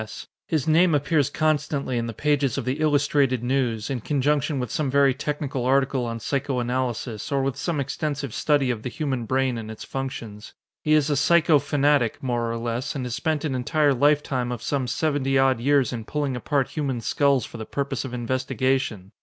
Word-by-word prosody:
S. 110 - -8 0.2
His 155 -4 -1
name 165 +1 +4
appears 145 0 +2
constantly 150 -4 0
in 115 - -2
the - - -3
pages 145 +1 0
of 135 - -3
the 130 +4 -2
Illustrated 140 -4 +2
News, 120 -4 0
in 130 -4 -3
conjunction 145 +1 0
with 125 -3 -3
some 150 -3 -1
very 140 0 +4
technical 140 -2 -3
article 135 0 +2
on 115 0 -4
psycho 135 +3 -2
analysis 120 -2 -2
or 135 -1 +1
with 135 -1 -1
some 170 -4 -2
extensive 140 -2 -3
study 145 -4 +2
of 115 -3 -4
the 125 - -4
human 130 -4 -3
brain 130 -1 +1
and 110 -1 -7
its 110 - -8
functions. 115 -6 -6 0.3
He 155 - +2
is 150 -1 +3
a - - +2
psycho 155 +2 +4
fanatic, 145 -4 +2
more 120 -2 -1
or 115 - -3
less, 120 +5 -3
and 130 -3 -3
has 125 - -4
spent 155 +4 -1
an 145 - -1
entire 145 +3 +2
lifetime 135 -2 +1
of 120 -2 -5
some 135 -3 -1
seventy 135 0 0
odd 135 -2 +3
years 135 +1 +2
in 115 -3 -5
pulling 145 -1 -2
apart 135 +2 0
human 140 -5 -2
skulls 140 0 +2
for - - -10
the 110 - -6
purpose 140 0 -2
of 130 - -6
investigation. 130 -4 -1
135 Hz, 195 wpm, -24 LUFS, 125-145 Hz, 0.3 s, name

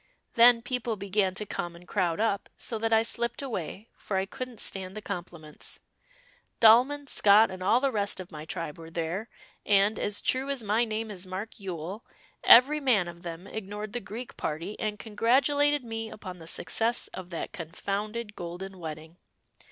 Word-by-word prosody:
Then 235 0 +7
people 245 -2 -1
began 200 -1 0
to 210 - -3
come 175 -3 -4
and 175 +1 -15
crowd 180 -4 0
up, 215 -2 0
so 225 - -3
that 225 +1 0
I 225 0 +5
slipped 235 +3 -2
away 215 - -5
for 195 - -3
I 190 - +1
couldn't 255 +1 -7
stand 190 +1 -1
the - - -5
compliments. 170 -6 -7 0.8
Dahlmann, 250 +6 +6
Scott, 210 -4 +5
and 185 0 -7
all 210 +6 +4
the 275 0 +1
rest 205 -4 0
of 185 - -8
my 150 -1 -7
tribe 160 -1 -5
were 165 0 -9
there, 170 +6 -3 0.3
and, 205 +1 +3
as 205 0 +1
true 260 +2 +1
as 275 -4 -1
my 215 +3 +2
name 220 0 -3
is 185 -2 -6
Mark 190 +5 -6
Yule, 185 +2 -5 0.4
every 275 +6 +8
man 235 -11 +3
of 170 0 -9
them 170 +1 -7
ignored 210 0 -6
the 245 - -1
Greek 230 +4 -8
party 165 +7 -3
and 210 -1 -2
congratulated 275 +7 +2
me 225 -1 -4
upon 185 -5 -9
the 160 - -11
success 230 +6 0
of 185 -1 -8
that 170 - -5
confounded 205 +6 -4
Golden 180 +2 -7
Wedding." 160 0 -8
205 Hz, 175 wpm, -28 LUFS, 180-230 Hz, 0.8 s, every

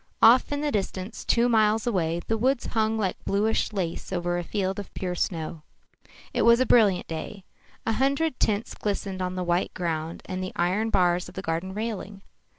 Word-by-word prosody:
Off 240 +5 +6
in 290 0 -1
the 295 -1 0
distance, 195 -1 -3
two 235 +1 +3
miles 220 -2 +3
away, 170 -7 0
the 225 - 0
woods 250 +3 +1
hung 220 -1 0
like 195 -4 -2
bluish 215 +3 +1
lace 185 -5 -3
over 175 -1 -1
a - - -3
field 190 +1 -2
of 200 - -7
pure 180 -1 -2
snow. 165 -3 -3 0.7
It - - +1
was 235 +1 +6
a 255 - +3
brilliant 205 -7 +4
day. 165 +4 -6 0.4
A 225 - +1
hundred 275 +5 +1
tints 210 +1 0
glistened 195 -2 -3
on 180 0 -2
the 185 - -2
white 175 +1 0
ground 165 -2 -3
and 185 -1 -4
the 185 - -5
iron 190 +6 +1
bars 180 -3 +2
of - - -15
the 190 - -5
garden 170 +4 -3
railing. 210 -2 -5
195 Hz, 190 wpm, -26 LUFS, 180-225 Hz, 0.7 s, Off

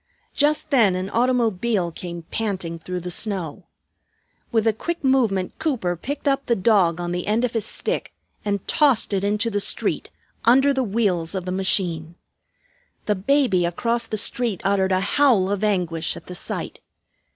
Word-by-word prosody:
Just 305 +1 +1
then 220 -9 +4
an 185 +2 -4
automobile 230 -6 +1
came 170 0 -7
panting 185 -6 -3
through 180 +2 -5
the 180 +1 -5
snow. 185 -6 -2 0.8
With 225 -2 +2
a 225 - +3
quick 340 +10 -4
movement 230 -9 +1
Cooper 255 - -1
picked 285 - -5
up 275 0 +1
the 235 - +3
dog 185 -5 +3
on 175 0 -3
the 175 0 -3
end 220 +3 +1
of 245 - -2
his 225 -3 -1
stick - - -2 0.3
and 200 -2 -2
tossed 280 -9 +3
it 195 -1 0
into 210 +3 0
the 205 - 0
street, - - 0 0.3
under 270 +4 +5
the 265 - 0
wheels 200 -7 0
of 185 -1 -3
the 185 - -3
machine. 175 -3 0 0.9
The 210 - +2
baby 205 -2 +2
across 230 +8 -1
the 215 - -3
street 230 -1 0
uttered 195 -1 +1
a 185 0 +2
howl 205 -3 +3
of 205 0 -2
anguish 175 -6 0
at - - -12
the 180 - -8
sight. 180 - -4
205 Hz, 170 wpm, -22 LUFS, 180-235 Hz, 0.9 s, under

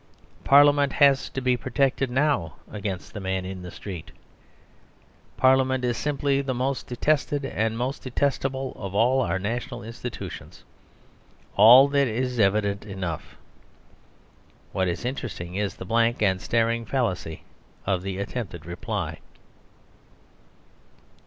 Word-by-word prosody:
Parliament 145 0 +5
has 140 -1 +4
to 135 - -4
be 125 -1 +2
protected 130 +1 0
now 130 - +1 0.2
against 100 -3 -5
the 105 - -5
man 95 -1 -2
in 95 0 -6
the 90 - -7
street. 90 -3 -8 1.3
Parliament 130 -1 +3
is 120 -1 0
simply 140 +1 0
the 135 -2 -2
most 130 +2 -2
detested 145 +2 0
and 110 -4 -1
the - - -5
most 130 +3 -2
detestable 135 0 -1
of 100 -1 -6
all 125 +5 +3
our 95 - 0
national 120 +5 -4
institutions: 115 +2 -8 0.9
all 120 +7 +9
that 140 -1 +2
is 125 +2 -2
evident 100 0 +2
enough. 95 -6 -6 1.3
What 95 -1 0
is 90 +6 -3
interesting 115 -9 -4
is 100 +1 -2
the - - -8
blank 115 +3 +2
and 95 -2 +2
staring 115 0 +1
fallacy 95 - -2 0.4
of 95 -2 0
the 95 0 -4
attempted 100 -5 -5
reply. 85 +1 -4
120 Hz, 125 wpm, -25 LUFS, 95-135 Hz, 1.3 s, all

